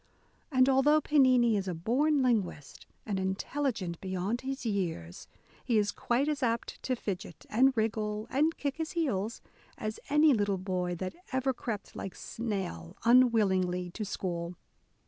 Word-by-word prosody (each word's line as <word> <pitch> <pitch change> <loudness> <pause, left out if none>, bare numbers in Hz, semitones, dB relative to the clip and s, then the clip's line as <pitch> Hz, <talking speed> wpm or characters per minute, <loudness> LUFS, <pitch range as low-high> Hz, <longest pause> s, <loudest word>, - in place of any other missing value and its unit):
And 255 -1 +5
although 275 +3 +5
Pennini 255 -6 +4
is 195 -1 -3
a 180 - -2
born 270 - +2
linguist, 205 - -1 0.2
and 200 -3 -1
intelligent 190 - -2
beyond 190 +5 -2
his 265 -1 -4
years, 170 - -3 0.4
he 235 -4 +2
is 205 -1 +2
quite 250 +4 0
as 300 -2 -1
apt 230 -2 -1
to 255 - -1
fidget, 200 -4 -6
and 260 +3 +4
wriggle, 215 -1 -1
and 310 +5 +2
kick 280 0 -2
his 320 0 -3
heels, 235 - -1 0.4
as 215 0 -4
any 300 0 +5
little 205 -4 +1
boy 180 -1 -2
that 185 +2 -4 0.2
ever 260 0 +1
crept 220 -4 -5
like 195 - -6
snail 195 - -4
un 250 +2 +7
willingly 185 -5 +1
to 215 - -5
school. 175 -3 -3
220 Hz, 150 wpm, -30 LUFS, 190-260 Hz, 0.4 s, un